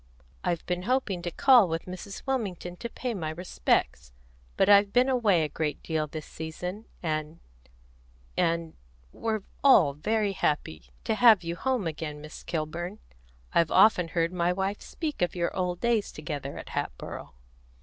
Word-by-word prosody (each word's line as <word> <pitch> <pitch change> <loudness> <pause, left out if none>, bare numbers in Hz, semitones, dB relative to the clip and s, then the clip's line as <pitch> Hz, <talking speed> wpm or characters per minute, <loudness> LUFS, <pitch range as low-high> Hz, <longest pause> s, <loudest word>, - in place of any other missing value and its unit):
"I've 170 -2 -1
been 180 0 -1
hoping 240 -9 0
to 175 - -3
call 245 +3 +6
with 165 0 -3
Mrs. 185 +2 -8
Wilmington 200 -9 -2
to 235 - -5
pay 245 +1 -4
my 165 -7 -3
respects; 155 - -1 0.5
but - - +4
I've 200 0 +6
been 250 +3 +4
away 215 -10 +3
a - - 0
great 150 0 -3
deal 155 -2 -1
this 155 0 -7
season, 180 +6 -6 0.2
and 155 0 -2 1.0
and 165 -1 0 0.4
We're 220 - -2 0.2
all 190 - +6
very 210 +7 0
happy 80 - -2
to - - 0
have 220 -4 +6
you 170 0 -3
home 255 +2 -1
again, 155 -2 -4
Miss 150 +1 -10
Kilburn. 170 +4 -4 0.6
I've 170 -1 +3
often 185 -5 +5
heard 165 +1 0
my 175 -1 +1
wife 195 +2 -2
speak 310 - -5
of 175 - +1
your 170 -1 -1
old 180 -2 -1
days 235 -3 +1
together 145 -3 -5
at - - -8
Hatboro'." - - -5
175 Hz, 160 wpm, -28 LUFS, 160-210 Hz, 1.0 s, call